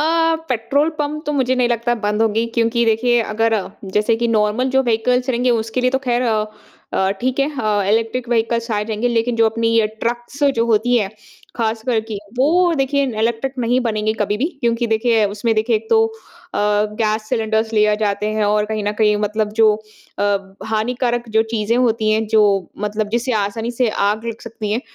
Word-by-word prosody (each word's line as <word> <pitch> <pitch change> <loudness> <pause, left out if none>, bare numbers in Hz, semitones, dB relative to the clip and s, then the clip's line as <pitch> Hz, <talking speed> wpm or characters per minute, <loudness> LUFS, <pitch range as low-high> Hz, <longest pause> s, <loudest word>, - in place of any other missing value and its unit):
अ, - - +2 0.4
petrol 265 +5 +1
pump 300 +1 -2
तो 295 - 0
मुझे 260 -3 +1
नहीं 250 -1 +2
लगता 240 0 0
बंद 210 +1 +1
होंगी 225 +1 +1
क्योंकि 235 0 +2
देखिए 235 +2 +2
अगर 225 +1 0 0.4
जैसे 210 +2 +2
कि 235 0 0
नॉर्मल 220 +4 +1
जो 265 0 +3
व्हीकल्स 250 +2 +1
रहेंगे 250 0 +1
उसके 225 +1 0
लिए 255 0 +2
तो 265 - +1
ख़ैर 240 0 +1 0.7
अ, 190 0 +1
ठीक 255 +1 -1
है 275 - +3
अ, 210 -2 +1
इलेक्ट्रिक 230 +2 0
व्हीकल्स 230 0 0
आए 210 -1 0
रहेंगे 220 +2 -1
लेकिन 235 0 0
जो 225 -1 +4
अपनी 230 +1 0
ये 220 - +3 0.2
ट्रक्स 240 +4 -3 0.2
जो 230 - +3
होती 235 +2 +2
हैं 200 -3 -2 0.5
ख़ास 225 -1 -1
कर 235 -3 +2
कि 210 -3 -4 0.2
वो 340 +6 +3
देखिए 275 +1 +1 0.2
इलेक्ट्रिक 235 +3 -1
नहीं 245 +1 +1
बनेंगे 220 -3 0
कभी 205 0 0
भी 245 - -1 0.2
क्योंकि 235 0 +1
देखिए 225 0 +2
उसमें 225 +2 0
देखिए 220 +1 +2
एक 220 +1 -7
तो 225 0 +5
अ, 225 -2 -11 0.4
गैस 215 0 -1
सिलेंडरस 220 -2 0
ले 210 0 +3
जाते 210 0 0
हैं 215 - +2
और 210 0 +2
कहीं 215 -1 -3
न 205 - 0
कहीं 210 -1 +4
मतलब 210 0 -2
जो 215 -1 +6 0.4
अ, - - +1 0.5
हानिकारक 240 +2 -1
जो - - +5
चीज़ें 220 +1 0
होती 225 -3 +2
हैं 220 +1 +1
जो 215 - +6 0.4
मतलब 210 0 -2
जिसे 245 +2 -1
आसानी 225 +3 -4
से 245 - +4 0.2
आग 215 +2 -3
लग 230 0 -5
सकती 215 -2 -5
है 225 - 0
230 Hz, 195 wpm, -19 LUFS, 215-245 Hz, 0.7 s, जो